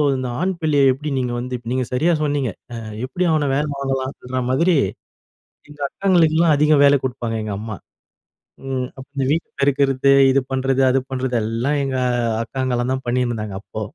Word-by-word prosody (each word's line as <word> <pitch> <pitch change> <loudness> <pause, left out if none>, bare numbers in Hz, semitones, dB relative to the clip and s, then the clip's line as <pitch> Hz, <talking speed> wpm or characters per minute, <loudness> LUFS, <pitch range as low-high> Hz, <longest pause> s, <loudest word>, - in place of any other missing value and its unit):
இந்த 130 -1 -3
ஆண் 190 +1 +1
பிள்ளைய 145 -4 +3
எப்படி 150 +3 -5
நீங்க 125 -1 -2
வந்து" 125 +1 -4 0.2
நீங்க 130 0 0
சரியா 160 +7 +2
சொன்னீங்க. 145 -4 0 0.2
அ - - -5 0.3
எப்படி? 175 +8 -2
அவன 150 -2 +1
வேலை 150 +1 0
வாங்கலாம்ன்ற 130 -1 -3
மாதிரி, 170 +7 +3 0.9
எங்க 150 0 -14
அக்காங்களுக்கலாம் 165 -4 +3
அதிக 150 +1 +3
வேலை 140 0 +6
கொடுப்பாங்க 120 -3 -3
எங்கம்மா. 105 +1 -5 0.9
ம் 130 -1 -1
அப்ப 130 - -9
இந்த 135 -1 0
வீடு 165 +2 0
பெருக்கறது, 140 -1 +3 0.2
இது 135 - +4
பண்றது 135 0 +1
அது 135 +1 +3
பண்றது 130 -1 -2
எல்லாம் 115 +7 -1
எங்க 135 -1 -2 0.5
அக்காங்கலாம் 130 -1 -2
தான் 130 - -4
பண்ணினிருந்தாங்க, 120 -5 -1
அப்போ. 110 - -7
135 Hz, 155 wpm, -20 LUFS, 125-145 Hz, 0.9 s, வேலை